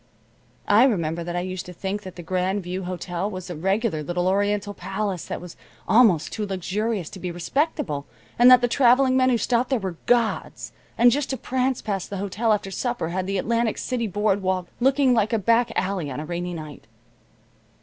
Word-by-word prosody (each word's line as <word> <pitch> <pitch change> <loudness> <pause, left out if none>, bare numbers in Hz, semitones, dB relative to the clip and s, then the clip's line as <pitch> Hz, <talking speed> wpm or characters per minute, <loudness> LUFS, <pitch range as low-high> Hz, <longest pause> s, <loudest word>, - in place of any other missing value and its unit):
I 215 +5 +6
remember 170 -8 0
that 175 +1 -5
I 175 - 0
used 185 -1 -5
to 180 - -8
think 195 +3 -4
that 185 -3 -10
the 175 - -8
Grand 185 +3 -1
View 180 +1 -4
Hotel 180 +1 -3
was 185 -2 -7
a - - -5
regular 195 +1 0
little 175 +4 -1
oriental 205 +1 0
palace 195 -3 -3
that - - -5
was 180 -1 -10 0.3
almost 215 -10 +4
too 215 - -3
luxurious 195 0 -2
to 190 - -9
be 180 - -4
respectable, 170 - -2 0.3
and 245 +1 +8
that 250 -1 +8
the 245 - +2
traveling 255 +1 +4
men 260 0 +4
who 245 - +3
stopped 240 +2 0
there 265 - +2
were 190 -6 -5
gods, 235 -2 0 0.3
and 240 +1 +6
just 275 +2 -1
to 265 - -2
prance 260 0 -1
past 195 -4 -3
the 200 - -4
hotel 200 +4 -1
after 200 -2 0
supper 240 -3 -2
had 185 +1 -2
the 195 0 -1
Atlantic 230 +3 0
City 240 -3 -2
board 205 0 0
walk 185 -1 -1
looking 265 +1 +3
like 225 -1 +1
a - - +4
back 230 +3 +2
alley 185 -5 -1
on 130 - -5
a 155 - -5
rainy 175 +1 -4
night. 150 -8 -9
195 Hz, 200 wpm, -24 LUFS, 180-235 Hz, 0.3 s, and